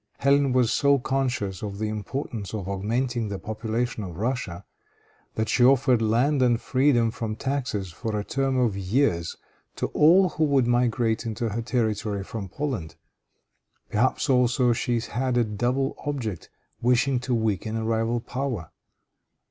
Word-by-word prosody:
Hélène 140 Hz, 0 st, +4 dB
was 125 Hz, -2 st, +3 dB
so 140 Hz, 0 st, +4 dB
conscious 125 Hz, -8 st, -2 dB
of 100 Hz, -2 st, -5 dB
the 110 Hz, +1 st, -2 dB
importance 110 Hz, 0 st, -4 dB
of 100 Hz, -4 st, -5 dB
augmenting 115 Hz, +4 st, -1 dB
the 100 Hz, -, -3 dB
population 110 Hz, +2 st, -3 dB
of 90 Hz, -4 st, -7 dB
Russia, 110 Hz, -5 st, -3 dB, 0.7 s
that 110 Hz, 0 st, -1 dB
she 115 Hz, +3 st, +2 dB
offered 130 Hz, -2 st, +4 dB
land 125 Hz, +6 st, +2 dB
and 120 Hz, -2 st, +3 dB
freedom 130 Hz, -4 st, +2 dB
from 110 Hz, -1 st, -4 dB
taxes 120 Hz, -7 st, -2 dB
for 105 Hz, +6 st, -4 dB
a -, -, -3 dB
term 135 Hz, +3 st, -1 dB
of 120 Hz, -6 st, +2 dB
years 95 Hz, -3 st, 0 dB, 0.4 s
to -, -, -2 dB
all 180 Hz, +5 st, +5 dB
who 160 Hz, -, -1 dB
would 140 Hz, -4 st, +3 dB
migrate 120 Hz, -1 st, +1 dB
into 115 Hz, +1 st, -2 dB
her 110 Hz, +3 st, -3 dB
territory 110 Hz, -4 st, -1 dB
from 100 Hz, -1 st, -6 dB
Poland. 125 Hz, -, -4 dB, 1.0 s
Perhaps 120 Hz, +8 st, +1 dB
also 125 Hz, -2 st, +3 dB
she 120 Hz, +1 st, 0 dB
had 125 Hz, +2 st, -1 dB
a 120 Hz, -, +4 dB
double 120 Hz, +6 st, -1 dB
object, 120 Hz, -, -4 dB, 0.3 s
wishing 125 Hz, +2 st, +2 dB
to 125 Hz, 0 st, -1 dB
weaken 110 Hz, -1 st, -1 dB
a 110 Hz, 0 st, -2 dB
rival 115 Hz, +1 st, 0 dB
power. 125 Hz, -, -4 dB
120 Hz, 150 wpm, -25 LUFS, 110-130 Hz, 1.0 s, all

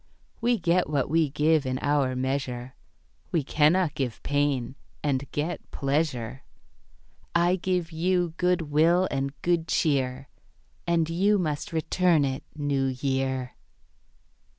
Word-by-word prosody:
We 240 Hz, +1 st, +2 dB
get 175 Hz, -2 st, +1 dB
what 140 Hz, -2 st, 0 dB
we 160 Hz, -2 st, +3 dB
give 150 Hz, +2 st, +2 dB
in 130 Hz, -1 st, -2 dB
our 140 Hz, -2 st, +1 dB
measure, 130 Hz, -1 st, -3 dB, 0.6 s
We 165 Hz, -4 st, +1 dB
cannot 155 Hz, +4 st, +3 dB
give 125 Hz, -5 st, -4 dB
pain 145 Hz, -4 st, 0 dB, 0.3 s
and 140 Hz, -2 st, -1 dB
get 155 Hz, +4 st, -3 dB
pleasure; 135 Hz, -4 st, -1 dB, 0.9 s
I 175 Hz, +1 st, +4 dB
give 180 Hz, -2 st, -1 dB
you 175 Hz, +1 st, 0 dB
good 180 Hz, -1 st, +2 dB
will 165 Hz, +5 st, +3 dB
and 135 Hz, +1 st, -3 dB
good 170 Hz, -2 st, +1 dB
cheer, 135 Hz, -3 st, 0 dB, 0.6 s
And 170 Hz, -2 st, +2 dB
you 195 Hz, +5 st, +2 dB
must 160 Hz, +1 st, -2 dB
return 165 Hz, -1 st, +2 dB
it, 135 Hz, -1 st, -3 dB
New 145 Hz, -3 st, 0 dB
Year. 130 Hz, -1 st, -2 dB
150 Hz, 125 wpm, -26 LUFS, 135-170 Hz, 0.9 s, I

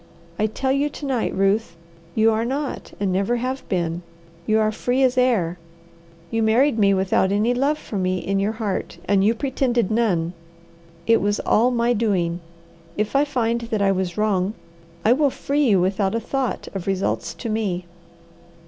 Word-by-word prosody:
I 215 Hz, -, +3 dB
tell 265 Hz, +5 st, -2 dB
you 280 Hz, +2 st, +1 dB
to 290 Hz, -, -8 dB
night, 260 Hz, -5 st, 0 dB
Ruth, 195 Hz, 0 st, +1 dB, 0.4 s
you 225 Hz, 0 st, +4 dB
are 220 Hz, +1 st, 0 dB
not 275 Hz, +4 st, -3 dB
and 200 Hz, -2 st, 0 dB
never 195 Hz, +6 st, +1 dB
have 255 Hz, +2 st, -2 dB
been. 170 Hz, -2 st, -1 dB, 0.5 s
You 215 Hz, -, +3 dB
are 215 Hz, 0 st, +2 dB
free 250 Hz, +4 st, 0 dB
as 255 Hz, -1 st, +3 dB
air. 210 Hz, -10 st, +1 dB, 0.7 s
You 225 Hz, -, 0 dB
married 225 Hz, +3 st, +3 dB
me 200 Hz, -1 st, +5 dB
without 190 Hz, 0 st, +2 dB
any 215 Hz, +4 st, +2 dB
love 280 Hz, +5 st, +1 dB
for 210 Hz, -8 st, -5 dB
me 185 Hz, 0 st, 0 dB
in 195 Hz, +2 st, -1 dB
your 205 Hz, +3 st, 0 dB
heart, 210 Hz, -6 st, -3 dB
and 195 Hz, 0 st, +3 dB
you 220 Hz, +3 st, +3 dB
pretended 245 Hz, -4 st, 0 dB
none. 185 Hz, -7 st, +1 dB, 0.7 s
It 230 Hz, -, +4 dB
was 205 Hz, +1 st, 0 dB
all 235 Hz, +3 st, +3 dB
my 240 Hz, -1 st, +1 dB
doing. 185 Hz, -7 st, 0 dB, 0.6 s
If 215 Hz, +4 st, -1 dB
I 280 Hz, +2 st, +4 dB
find 235 Hz, -4 st, 0 dB
that 215 Hz, -3 st, 0 dB
I 195 Hz, -, +4 dB
was 185 Hz, -2 st, -2 dB
wrong, 205 Hz, -1 st, +1 dB, 0.5 s
I 225 Hz, -, +6 dB
will 285 Hz, +2 st, +3 dB
free 285 Hz, +2 st, 0 dB
you 195 Hz, -3 st, +4 dB
without 190 Hz, +2 st, 0 dB
a -, -, +1 dB
thought 260 Hz, +2 st, -3 dB
of 195 Hz, -2 st, -5 dB
results 195 Hz, 0 st, -1 dB
to 240 Hz, -, -6 dB
me. 205 Hz, -5 st, -2 dB
220 Hz, 180 wpm, -22 LUFS, 195-245 Hz, 0.7 s, I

